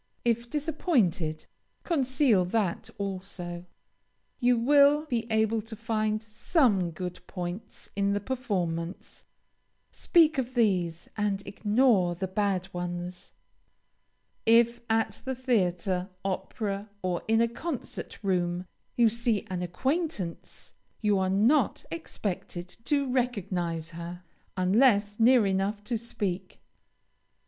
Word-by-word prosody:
If 235 0 +1
disappointed, 240 - 0 0.4
conceal 260 - +3
that 190 -2 -1
also. 185 -3 -5 0.7
You 245 -1 +4
will 285 +4 +5
be 240 -6 -2
able 220 0 +2
to 225 +1 -8
find 215 -1 -1
some 220 - +2
good 180 +2 -6
points 180 +4 -6
in 200 0 +1
the 205 - +1
performance; 190 -8 -3 0.7
speak 315 -4 +4
of 255 0 -3
these 180 -8 +1
and 205 -2 -1
ignore 205 -4 +2
the 190 +2 -3
bad 190 -1 0
ones. 175 0 -5 1.1
If 235 +1 +5
at 225 0 0
the 265 0 -3
theatre, 185 -7 0 0.2
opera, 200 +2 -3
or 180 -1 -1
in 225 0 +3
a 235 - +4
concert 255 -1 -6
room, 180 -2 0 0.3
you 235 -1 +5
see 230 -1 +1
an 180 -1 -2
acquaintance, 210 - -3 0.3
you 210 -3 +3
are 190 0 +1
not 220 +10 +3
expected 185 - -4 0.2
to 280 -2 +1
recognize 185 -10 -1
her, 170 +1 -7 0.3
unless 205 +2 +3
near 240 -1 +6
enough 195 +2 0
to 235 +3 -2
speak. 195 -5 -3
205 Hz, 110 wpm, -28 LUFS, 180-240 Hz, 1.1 s, near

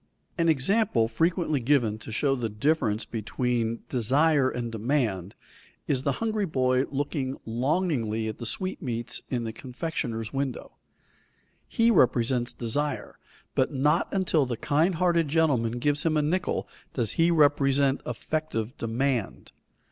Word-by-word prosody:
_ - - -42 0.3
An 165 -1 +2
example 160 - +2
frequently 160 +5 +1
given 120 -4 +1
to 110 - -9
show 135 +5 +1
the 120 -3 -2
difference 110 -1 0
between 115 +1 -2
desire 135 +3 +3
and 120 -2 -4
demand 110 -5 -1 0.5
is 135 -3 0
the 140 0 0
hungry 215 0 -1
boy 130 -3 +2
looking 140 -1 -2
longingly 120 - 0
at 110 - -5
the 120 - -4
sweetmeats 125 - -3
in 120 -2 -1
the 110 -1 -4
confectioner's 120 -3 -4
window. 135 -2 -3 1.0
He 230 +1 +3
represents 120 - +2
desire, 145 +6 -3 0.3
but 130 - +1
not 150 +3 +2
until 170 -7 +2
the 120 -2 -3
kind 160 +9 +1
hearted 170 -2 +2
gentleman 140 -7 +2
gives 145 +4 0
him 155 -2 +1
a 150 - +2
nickel 175 +5 -1 0.3
does 115 -5 0
he 165 +1 +3
represent 140 -3 +3
effective 125 -1 -3
demand. 120 -1 -2
135 Hz, 135 wpm, -27 LUFS, 115-155 Hz, 1.0 s, desire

